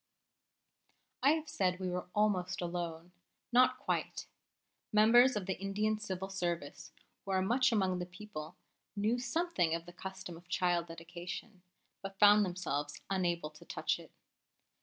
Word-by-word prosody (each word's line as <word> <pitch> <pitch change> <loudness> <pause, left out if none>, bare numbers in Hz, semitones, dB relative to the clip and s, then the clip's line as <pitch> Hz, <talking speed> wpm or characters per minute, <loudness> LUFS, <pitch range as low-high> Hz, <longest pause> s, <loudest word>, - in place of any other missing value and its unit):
I 280 +3 +6
have 320 -1 -3
said 190 -11 0
we 185 -1 -2
were 180 0 -3
almost 200 -4 +1
alone, 170 -1 -4 0.4
not 255 +1 +5
quite. - - -2 0.7
Members 235 +4 +6
of 205 -3 -2
the 190 -1 -3
Indian 210 +2 0
Civil 190 -2 -4
Service, 175 -6 -3 0.3
who - - -10
are 190 -1 +2
much 250 +6 +3
among 190 -4 +1
the 180 - -4
people, 180 -4 -8 0.4
knew 215 +4 +1
something 250 - +1
of 165 0 -5
the 175 - -11
custom 190 -2 -7
of 170 +1 -18
child 175 -1 +1
dedication, 175 +4 -8 0.4
but 195 0 -7
found 205 +1 +7
themselves 165 -6 -3
unable 175 -5 0
to 150 - -15
touch - - -1
it. - - -13
185 Hz, 145 wpm, -34 LUFS, 175-210 Hz, 0.7 s, found